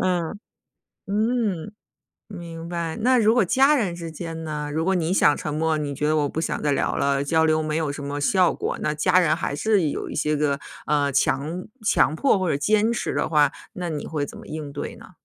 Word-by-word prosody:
嗯， 180 +1 -1 0.7
嗯， 215 -3 -1 0.6
明 170 -4 -8
白。 170 -2 -3
那 250 +2 +4
如 220 0 +4
果 240 -4 +4
家 270 - +4
人 200 -10 0
之 170 -1 -6
间 165 0 -6
呢？ 150 -1 -4
如 160 +1 -1
果 190 +2 +2
你 175 -1 0
想 150 -6 +4
沉 150 - -4
默， 160 0 +1
你 145 -2 -3
觉 150 +2 -1
得 155 +1 +2
我 145 -2 +1
不 160 - -3
想 - - -2
再 145 -1 +2
聊 - - 0
了， 140 0 +1
交 160 +2 +2
流 155 0 +2
没 155 0 -2
有 155 -3 -1
什 145 - -7
么 140 +1 -4
效 180 +4 +3
果， - - -3
那 150 - 0
家 155 +4 +3
人 165 -4 +3
还 140 - -3
是 195 0 +2
有 - - -4
一 - - -7
些 150 0 0
个， 145 -1 0 0.3
呃， 145 -2 +1
强 145 +6 0 0.2
强 205 - +3
迫 210 - +3
或 185 -2 -1
者 - - +1
坚 215 +8 +2
持 235 - -2
的 - - 0
话， 150 -3 +3 0.2
那 180 -1 -4
你 155 -3 -4
会 150 -3 -2
怎 - - -10
么 - - -12
应 150 -2 -6
对 145 - -5
呢？ - - -14
160 Hz, 245 characters per minute, -24 LUFS, 150-185 Hz, 0.7 s, 那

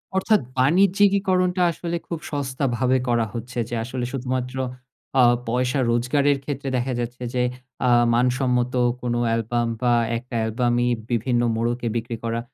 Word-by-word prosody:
অর্থাৎ, 205 +2 +3 0.2
বাণিজ্যিকীকরণটা 185 +4 +3
আসলে 170 +1 -4
খুব 170 - -4
সস্তাভাবে 130 -3 0
করা 120 -1 +2
হচ্ছে 120 +1 -6
যে, 120 - -3
আসলে 125 +1 -4
শুধুমাত্র 130 -1 -3 0.6
আ - - +7 0.3
পয়সা 125 +3 0
রোজগারের 140 +4 +2
ক্ষেত্রে 140 -1 -4
দেখা 125 +1 -1
যাচ্ছে 120 +1 -4
যে, 125 -1 +1 0.4
আ - - +4 0.2
মানসম্মত 125 0 +1 0.3
কোন 120 -1 -1
অ্যালবাম, 115 +1 0
বা 120 -1 +3 0.2
একটা 125 0 -8
অ্যালবামই 120 +2 +1 0.2
বিভিন্ন 120 +1 +1
মোড়কে 120 +1 -1
বিক্রি 115 +1 -2
করা। 115 0 -1
125 Hz, 135 wpm, -23 LUFS, 120-140 Hz, 0.6 s, আ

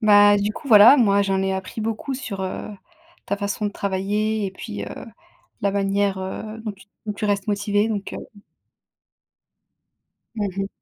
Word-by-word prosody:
Bah, 205 -1 +6
du 205 +1 -1
coup 275 - -9
voilà, 220 +5 +9
moi 200 -5 +4
j'en 195 -1 0
ai 190 - 0
appris 190 +3 -5
beaucoup 225 +5 -3
sur, 215 -7 -5
heu, 190 +2 -4 0.6
ta 200 - -1
façon 200 +1 -2
de - - -2
travailler 205 +2 -1
et - - -4
puis, 100 - -7
heu, - - -7 0.7
la 200 -1 +1
manière, 195 0 0
heu, 215 +4 -6
dont 215 - -3
tu 195 0 -19 0.2
dont 210 - -1
tu 210 - -5
restes 200 -1 0
motivée 205 +1 +1
donc 205 -3 -4
heu - - -5 2.2
Mmh 205 -2 -1
mh. 195 0 -1
205 Hz, 170 wpm, -22 LUFS, 195-215 Hz, 2.2 s, voilà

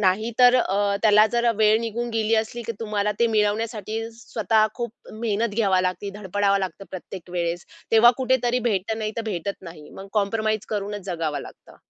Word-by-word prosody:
नाहीतर 225 +6 +4
अ, 200 +1 +1
त्याला 215 0 +6
जरा 235 0 +3
वेळ 215 0 +5
निघून 235 +1 -3
गेली 225 0 +1
असली, 225 +2 -1
की 230 - -2
तुम्हाला 210 -2 -1
ते 235 - +5
मिळवण्यासाठी 215 0 -1 0.2
स्वतः 220 -1 +1
खूप 235 -2 -4 0.2
मेहनत 220 -1 -1
घ्यावी 195 -5 +2
लागते, 185 +2 -2
धडपडावं 200 0 +1
लागतं 195 +1 -5
प्रत्येक 185 -1 -9
वेळेस. 175 -1 -2 0.3
तेव्हा 230 +2 +8
कुठेतरी 255 -2 +1
भेटतं, 210 +2 -1
नाहीतर 215 +1 -3
भेटत 190 +3 -4
नाही. 165 -4 -11
मग 195 - -10
कॉम्प्रोमाईज 215 +1 0
करूनच 205 -1 -3
जगावं 160 -5 -2
लागतं. - - -13
210 Hz, 160 wpm, -24 LUFS, 195-225 Hz, 0.3 s, तेव्हा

